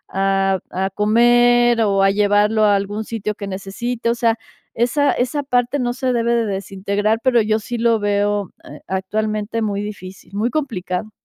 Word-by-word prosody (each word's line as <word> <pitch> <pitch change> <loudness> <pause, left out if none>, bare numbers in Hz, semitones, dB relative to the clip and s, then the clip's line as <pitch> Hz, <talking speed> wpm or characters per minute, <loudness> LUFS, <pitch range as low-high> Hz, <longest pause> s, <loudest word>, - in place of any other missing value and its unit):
a 195 -1 +1
a 190 +1 -1
comer 240 +3 +4
o 200 -3 +2
a 195 - +4
llevarlo 210 +1 +3
a 205 -1 +4
algún 205 +2 -2
sitio 215 -2 -3
que 200 -2 -7
necesite, 225 +5 -4
o - - -1
sea, 230 -1 +2 0.4
esa 265 +5 +2
esa 255 +4 -1
parte 250 +1 0
no 245 -1 -1
se 255 0 -1
debe 235 0 +1
de 230 - +1
desintegrar, 200 +2 -1
pero 245 -3 +4
yo 215 0 +1
sí 240 +3 -5
lo 230 -1 +3
veo, 205 -1 0
eh, - - -12
actualmente 215 +3 -2
muy 205 -1 -2
difícil, 190 -3 -9
muy 225 +4 0
complicado. 215 - -3
215 Hz, 170 wpm, -19 LUFS, 200-235 Hz, 0.4 s, comer